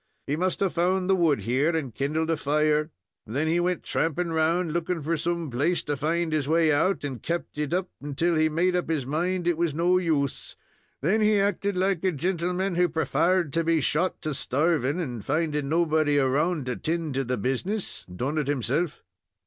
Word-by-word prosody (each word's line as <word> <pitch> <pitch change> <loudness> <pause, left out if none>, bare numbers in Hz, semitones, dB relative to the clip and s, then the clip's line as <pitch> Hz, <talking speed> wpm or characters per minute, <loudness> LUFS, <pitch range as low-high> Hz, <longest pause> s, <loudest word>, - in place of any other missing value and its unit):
He 145 - -1
must 185 +4 -1
have 195 -2 +1
found 180 +2 +1
the - - +5
wood 160 - +2
here 135 - +1
and 140 -7 -3
kindled 155 +5 -1
a - - +2
fire. 150 +1 +1 0.4
Then 140 +8 -1
he 165 +2 +2
wint 180 0 0
tramping 165 +1 0
round, 165 +1 +1
looking 170 -1 -2
for 165 +3 0
some 170 -1 -2
place 150 +9 0
to 145 - -2
find 160 +3 -1
his 150 -3 0
way 160 0 +3
out, 165 +6 +1
and 130 -6 -4
kept 170 -3 -4
it 150 0 -2
up 180 +1 0 0.3
till 170 +4 +2
he 155 -1 +3
made 175 +4 +1
up 180 -2 -1
his 155 -5 0
mind 175 +5 -1
it 170 -2 +1
was 170 -4 0
no 175 +3 +3
use 150 -6 -1 0.5
Then 190 +10 +2
he 210 -1 +4
acted 200 0 0
like 185 -1 0
a 190 - +2
gintleman 180 +3 -1
who 180 0 +3
prefarred 170 0 +1
to 165 - +1
be 165 0 +2
shot 165 +5 0
to 155 - -1
starving, 145 +2 0
and, 125 - -4
finding 150 +1 -1
nobody 155 -2 +2
around 145 +3 +1
to 125 -2 -3
'tend 160 -2 -2
to 135 +1 0
the 125 0 -2
business, 135 - -2
done 130 - -3
it 145 - -2
himself." 145 +4 -1
160 Hz, 195 wpm, -26 LUFS, 145-175 Hz, 0.5 s, the